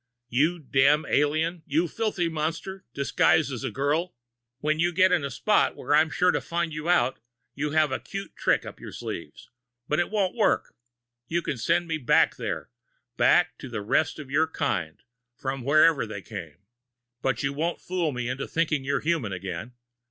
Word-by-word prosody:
"You 150 +9 +2
damned 145 0 +3
alien! 155 +4 +1
You 160 +5 +1
filthy 205 -2 -1
monster, 165 +4 -3
disguised 140 +2 +2
as 125 -4 -5
a - - -1
girl! 150 +6 -1 0.4
When 155 +3 0
you 175 +1 +2
get 185 +2 +4
in 175 -5 +2
a 140 - -2
spot 210 - +2
where - - -2
I'm 155 +1 +5
sure 180 +4 +3
to - - -1
find 170 -1 -2
you 155 +2 -4
out, 130 -8 +3 0.3
you 150 +2 -2
have 155 -3 +3
a 130 - -1
cute 195 0 -7
trick - - +1
up - - -9
your - - -9
sleeve - - -6 0.5
but 150 - +1
it 175 - +1
won't 200 -4 0
work. 220 - +1 0.5
You 170 +1 -1
can 140 - -2
send 170 +9 +1
me 160 -1 -2
back 125 - +3
there - - -4 0.4
back - - +4
to - - -8
the 105 - -4
rest 135 +8 +1
of 145 -4 -9
your 155 +3 +3
kind, 100 - -2 0.3
from 135 +2 -4
wherever 150 -1 +4
they 100 -3 -7
came. 85 -9 -8 0.6
But 135 +3 0
you 140 0 0
won't 165 +4 -2
fool 175 -4 -1
me 125 -2 -3
into 130 +2 -3
thinking 155 -4 0
you're 140 +1 0
human 155 - 0
again. 95 +5 -6
155 Hz, 185 wpm, -26 LUFS, 135-170 Hz, 0.6 s, I'm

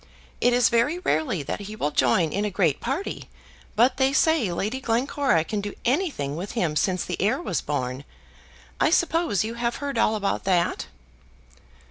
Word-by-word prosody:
It 245 - +4
is 245 -1 +4
very 240 +8 +2
rarely 160 - 0
that - - -4
he 205 +1 -7
will 150 -8 -1
join 150 +5 +2
in 200 - 0
a 210 - 0
great 175 -7 +1
party, 280 +11 -4 0.5
but 245 +4 +3
they 265 0 +2
say 300 - +3
Lady 215 +9 -2
Glencora 245 - +1
can 205 +4 -3
do 205 0 -6
anything 250 - 0
with 185 +5 -5
him 175 -10 0
since 185 +3 0
the 180 - -4
heir 215 +8 +2
was 185 - -2
born. 130 -2 -3 0.8
I - - +4
suppose 330 - +2
you 225 +1 -4
have 235 0 -2
heard 280 -4 -3
all 220 - +3
about 205 -2 -1
that." 180 -3 +1
215 Hz, 175 wpm, -25 LUFS, 175-265 Hz, 0.8 s, It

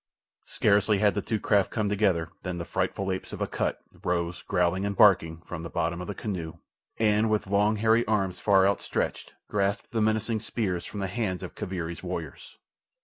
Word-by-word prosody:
Scarcely 105 0 +3
had 105 0 +3
the 105 - -1
two 110 +1 -2
craft 100 -2 +2
come 110 -3 -1
together 95 -5 +1
than 90 -2 -4
the 85 - -4
frightful 95 +2 -1
apes 95 - -5
of - - -6
Akut - - -1 0.3
rose, 85 0 -1
growling 90 0 +1
and 100 0 -1
barking, 85 -5 +5
from 90 -2 -6
the 85 - -6
bottom 85 +3 -1
of 90 - -6
the 105 - -4
canoe, 90 -7 -4 0.4
and, 110 0 +3
with 110 -1 +1
long, 100 +2 +2
hairy 110 +2 +3
arms 95 -4 0
far 95 -2 +4
outstretched, 100 - -2
grasped 100 0 -1
the 115 -2 0
menacing 110 +1 +1
spears 100 -5 -2
from 105 - -6
the 95 - -1
hands 95 -3 -2
of - - -7
Kaviri's 85 -2 -4
warriors. - - -6
100 Hz, 185 wpm, -27 LUFS, 90-105 Hz, 0.4 s, barking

